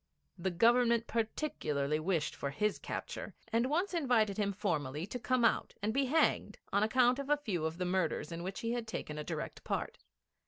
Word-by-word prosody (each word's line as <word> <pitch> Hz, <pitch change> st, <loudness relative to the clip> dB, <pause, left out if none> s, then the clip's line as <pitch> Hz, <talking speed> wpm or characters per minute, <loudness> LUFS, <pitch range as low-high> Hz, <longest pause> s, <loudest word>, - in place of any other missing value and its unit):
The 190 Hz, +1 st, -1 dB
Government 235 Hz, +4 st, +4 dB
particularly 155 Hz, -, -1 dB
wished 160 Hz, -2 st, 0 dB
for 140 Hz, -, -3 dB
his 210 Hz, +9 st, 0 dB
capture, -, -, -5 dB, 0.2 s
and 235 Hz, +3 st, +2 dB
once 355 Hz, +7 st, 0 dB
invited 245 Hz, -, +2 dB
him 200 Hz, -1 st, +1 dB
formally 155 Hz, -6 st, -2 dB
to 250 Hz, -, -5 dB
come 255 Hz, 0 st, +2 dB
out -, -, +1 dB
and 215 Hz, +2 st, -1 dB
be 275 Hz, +1 st, +2 dB
hanged 315 Hz, +5 st, +2 dB, 0.2 s
on 200 Hz, -, +4 dB
account 245 Hz, +4 st, +4 dB
of 280 Hz, 0 st, -4 dB
a 295 Hz, -, +4 dB
few 190 Hz, -, -2 dB
of 160 Hz, +1 st, -2 dB
the 180 Hz, -, -1 dB
murders 180 Hz, -3 st, 0 dB
in 170 Hz, 0 st, -4 dB
which 190 Hz, +2 st, -4 dB
he 230 Hz, -, -1 dB
had 240 Hz, -2 st, -2 dB
taken 150 Hz, -8 st, -4 dB
a -, -, -3 dB
direct -, -, -5 dB
part. -, -, -3 dB
215 Hz, 195 wpm, -33 LUFS, 170-245 Hz, 0.2 s, Government